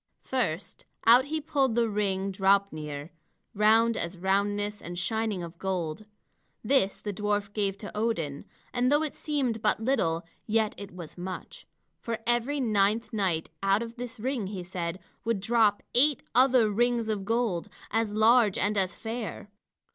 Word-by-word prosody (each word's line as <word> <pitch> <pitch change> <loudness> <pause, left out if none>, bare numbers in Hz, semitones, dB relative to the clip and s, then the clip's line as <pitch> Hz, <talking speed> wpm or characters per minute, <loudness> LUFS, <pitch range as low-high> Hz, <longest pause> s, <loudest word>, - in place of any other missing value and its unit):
First, 200 -9 -3 0.2
out 240 +3 +7
he 315 +2 -2
pulled 285 -6 +1
the 235 -1 +3
ring 200 -2 -1
Draupnir, 180 -7 0 0.4
round 225 +2 +4
as 170 -1 -4
roundness 205 +3 0
and 175 +1 -7
shining 210 +1 -1
of 170 0 -9
gold. 185 -1 -3 0.6
This 215 -4 +2
the 205 - -4
dwarf 205 0 -1
gave 200 -2 -1
to 205 0 -9
Odin, 170 -11 -2 0.3
and 250 +1 +2
though 295 +2 +4
it 305 - -3
seemed 265 -7 -1
but 215 - +2
little, 220 -9 +1 0.2
yet 220 -1 +2
it 200 -1 -8
was 175 -1 -10
much. 185 +1 -7 0.3
For 230 -1 -3
every 240 +5 +1
ninth 215 -1 +1
night 185 -7 0
out 195 +3 +2
of 235 +1 -9
this 245 -1 -6
ring, 245 -3 -2
he 190 -2 -5
said, 175 -1 -4 0.3
would 230 -3 0
drop 215 0 +2
eight 280 +2 +4
other 255 -2 +5
rings 235 +1 +1
of 210 -3 -1
gold, 215 -4 0 0.2
as 225 -1 +1
large 220 -1 +4
and 205 +1 +1
as 185 -1 -1
fair. 225 -2 -6
210 Hz, 155 wpm, -28 LUFS, 190-235 Hz, 0.6 s, out